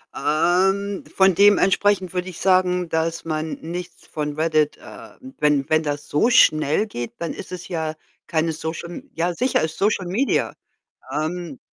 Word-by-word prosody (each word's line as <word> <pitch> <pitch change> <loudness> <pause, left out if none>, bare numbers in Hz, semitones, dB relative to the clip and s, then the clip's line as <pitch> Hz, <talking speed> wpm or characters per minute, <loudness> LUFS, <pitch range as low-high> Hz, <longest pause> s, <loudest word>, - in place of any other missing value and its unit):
ähm, 190 +6 +1
von 190 0 +5
dementsprechend 200 -1 +4
würde 180 0 -2
ich 175 - -10
sagen, 180 -2 +2
dass 165 +1 -1
man 155 0 -2
nichts 175 +2 -7
von 150 -1 -3
Reddit 155 -2 +1
äh, - - -12 0.3
wenn 150 -1 +2
wenn 155 0 +3
das 145 -1 -4
so 185 +11 +3
schnell 155 - +4
geht, 120 - -6
dann 170 - -3
ist 185 - -9
es 180 -1 -7
ja 160 -3 -3 0.3
keine 160 0 0
Social 160 +2 -5
M 270 +10 -9
ja, 175 +2 0
sicher 250 +8 +1
ist 160 0 -3
Social 200 -3 +1
Media. 225 +10 0 0.6
Ähm 160 -2 -3
170 Hz, 160 wpm, -22 LUFS, 155-190 Hz, 0.6 s, von